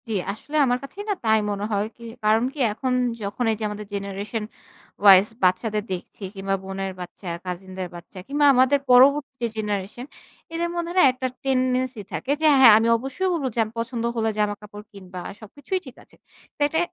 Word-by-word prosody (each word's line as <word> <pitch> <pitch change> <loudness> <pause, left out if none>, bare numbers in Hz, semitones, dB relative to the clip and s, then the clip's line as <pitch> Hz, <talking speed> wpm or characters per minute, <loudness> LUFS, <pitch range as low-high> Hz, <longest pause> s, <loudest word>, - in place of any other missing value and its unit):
জ্বি, 225 - -3 0.2
আসলে 260 +9 -9
আমার 245 -1 +1
কাছেই 385 +9 -8
না - - +3
তাই 220 0 +4
মনে 205 0 -2
হয়ই, 205 +1 0 0.4
কারণ 220 +2 +4
কি 300 - -10
এখন 255 +3 -2 0.3
যখন 200 +5 -3
এই - - 0
যে - - -4
আমাদের 210 0 -7
জেনারেশন 200 +2 -4 0.6
ওয়াইস 195 -1 +8 0.2
বাচ্চাদের 210 +4 +1
দেখছি 185 +3 -8
কিংবা 195 0 -1
বোনের 195 0 -4
বাচ্চা, 180 +1 -8 0.2
কাসিনদের 185 +1 -5
বাচ্চা 175 +2 -11
কিংবা 290 +1 +2
আমাদের 260 +2 +4
পরবর্তী 270 +2 +5
যে - - +2
জেনারেশন 210 +2 -3 0.5
এদের 340 +1 -1
মধ্যে 345 0 -3
না - - +7
একটা 255 0 -3 0.2
টেনডেন্সি 255 -2 0
থাকে 265 - -3
যে 315 - +4
হ্যাঁ, 245 -5 +9
আমি 225 +1 +2
অবশ্যই 270 +10 -2
বলব 320 -5 -2
যে - - -1
আমার 220 +1 -9
পছন্দ 230 0 -3
হলে 225 -1 +1
জামাকাপড় 205 0 -3
কিনবা 185 -3 -9 0.2
সবকিছুই 285 - -5
ঠিক 260 - -11
আছে। - - -23 0.4
তো - - -66
এটা 320 +2 -1
220 Hz, 180 wpm, -23 LUFS, 200-260 Hz, 0.6 s, হ্যাঁ